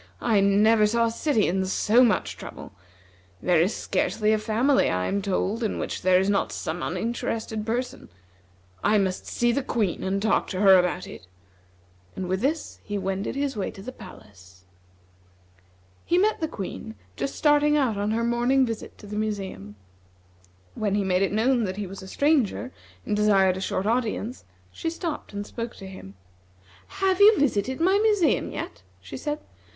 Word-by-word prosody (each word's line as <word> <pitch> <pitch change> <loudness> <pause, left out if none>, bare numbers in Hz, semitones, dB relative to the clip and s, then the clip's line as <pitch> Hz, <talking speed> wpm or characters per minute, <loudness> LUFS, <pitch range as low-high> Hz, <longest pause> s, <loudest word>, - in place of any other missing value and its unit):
"I 220 -4 +2
never 210 +2 +4
saw 230 +2 +2
a 230 - 0
city 230 -2 +1
in 190 +2 0
so 220 +5 +4
much 235 - +1
trouble. - - -10 0.7
There 175 -3 +3
is 185 +6 +1
scarcely 215 0 0
a 215 - +1
family, 235 +6 +2
I 90 0 -1
am 200 - -1
told, 200 +3 -1
in 220 - -1
which - - -4
there 185 0 +4
is 190 - 0
not 200 0 +1
some 165 +2 -4
uninterested 220 +2 -3
person 245 +3 -3 0.7
I 210 +1 +4
must 190 -2 -1
see 240 0 +1
the 280 - 0
Queen 220 -8 -1
and 190 +1 -1
talk 220 +1 +1
to 185 - -4
her 190 -2 +8
about 180 0 -1
it," 90 - -11 0.9
and 185 - -4
with 185 +2 -1
this 305 +4 -2
he 205 -1 -4
wended 195 +3 -3
his 275 -1 -1
way 200 - -2
to 195 - -11
the 255 - -6
palace. 95 - -15 1.4
He 350 - +1
met 420 +4 +2
the 320 - 0
Queen 185 - -7 0.2
just 140 +5 -3
starting 295 0 +3
out 260 -7 +1
on 205 +1 -1
her 225 +2 0
morning 240 +3 +2
visit 225 -2 -6
to - - -13
the 205 0 -7
museum. 195 - -4 1.0
When 205 -2 -1
he 205 - +1
made 185 -1 +1
it 195 - +1
known 235 +3 +2
that 185 0 -4
he 205 - -3
was 195 +1 -9
a 190 - -10
stranger, 270 -1 +1 0.3
and 210 - 0
desired 195 -3 +3
a 190 - -5
short 190 0 -2
audience, 230 +1 -1 0.3
she 330 - -3
stopped 335 -1 -5
and 205 0 -5
spoke 230 +2 -6
to 195 - -10
him. 185 - -10 0.7
"Have 380 -1 0
you 420 +1 +8
visited 260 -2 0
my 380 +4 +3
museum 420 -5 +2
yet?" - - -6 0.2
she - - -10
said. 295 -1 -3
215 Hz, 180 wpm, -25 LUFS, 190-250 Hz, 1.4 s, her